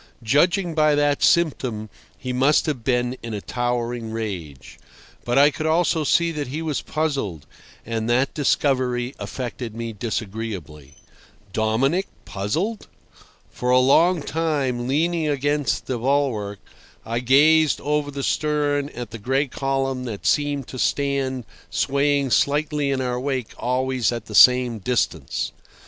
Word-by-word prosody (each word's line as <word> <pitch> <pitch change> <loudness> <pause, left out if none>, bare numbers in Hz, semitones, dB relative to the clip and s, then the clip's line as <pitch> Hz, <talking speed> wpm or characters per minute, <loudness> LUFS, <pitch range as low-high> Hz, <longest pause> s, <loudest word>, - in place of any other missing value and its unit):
Judging 170 - +2
by 155 -1 +3
that 145 -1 +1
symptom, 130 -10 +1 0.3
he 125 -2 -4
must 135 +4 +3
have 140 -7 -3
been 125 0 0
in 115 -2 -5
a - - -3
towering 120 0 -2
rage. 95 - -6 0.5
But 120 +1 0
I 145 +2 +6
could 155 +2 -3
also 160 0 +2
see 170 +3 +2
that 150 -4 -4
he 150 +6 -4
was 155 -3 -2
puzzled, 135 - -2 0.4
and 115 0 -2
that 130 +3 +2
discovery 130 -3 0
affected 120 -3 -5
me 115 -1 -5
disagreeably. 100 - -5 0.6
Dominic 130 - +1 0.2
puzzled! 165 - -3 0.6
For 125 - -3
a 125 - +5
long 155 +6 +4
time, 140 -7 -1
leaning 160 +3 +1
against 145 -3 0
the 125 -2 -3
bulwark, 120 -6 0 0.5
I 115 +2 -2
gazed 150 +5 +4
over 150 0 0
the 140 -1 -5
stern 145 -1 0
at 120 -3 -6
the 115 - -7
gray 130 +6 +1
column 135 -1 -2
that 110 -5 -6
seemed 145 -2 +1
to 130 - -7
stand 135 -2 0 0.3
swaying 140 +5 +1
slightly 145 +1 +1
in 135 -1 0
our 125 -1 -1
wake 130 -3 -3
always 130 -1 0
at 115 -2 -5
the 110 - -10
same 125 0 +6
distance. 95 - -1
130 Hz, 140 wpm, -23 LUFS, 115-145 Hz, 0.6 s, I